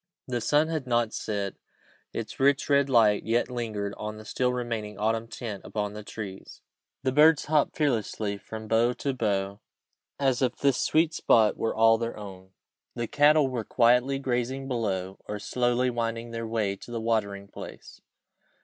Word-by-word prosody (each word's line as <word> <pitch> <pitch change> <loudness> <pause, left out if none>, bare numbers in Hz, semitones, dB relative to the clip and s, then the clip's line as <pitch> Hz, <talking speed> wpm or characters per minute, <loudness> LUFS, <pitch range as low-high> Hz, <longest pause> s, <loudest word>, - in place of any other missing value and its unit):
The 120 -2 -2
sun 150 +6 +3
had 155 -5 -3
not 120 -2 +1
set; 100 -2 -3 0.6
its - - -6
rich, 140 +1 +3
red 140 -1 +4
light 110 -5 +4
yet 120 +3 0
lingered 105 -4 -3
on 105 0 -5
the 110 - -11
still 125 +3 0
remaining 115 -4 -4
autumn 110 +2 0
tints 110 -5 -6
upon 105 +2 -3
the 105 - -7
trees. 100 -2 -8 0.4
The 130 - +1
birds 150 +2 +5
hopped 150 -1 +1
fearlessly 110 -7 -1
from 110 +2 -8
bough 115 +2 +3
to 140 +2 -2
bough, 100 -4 -1 0.6
as 135 -3 +1
if 125 -3 +1
this 140 -3 +2
sweet 160 0 +2
spot 110 -8 +4
were 115 - -2
all 115 0 +5
their 115 -1 -3
own. 95 -3 -10 0.5
The 120 - -2
cattle 145 +3 +4
were 125 -3 -3
quietly 125 +4 +3
grazing 130 0 -2
below, 95 -7 -2
or 105 - -3
slowly 120 +3 0
winding 115 0 -3
their 115 0 -4
way 110 -3 -1
to - - -12
the 120 -1 -3
watering 100 -3 -1
place. - - -11
115 Hz, 165 wpm, -27 LUFS, 105-130 Hz, 0.6 s, birds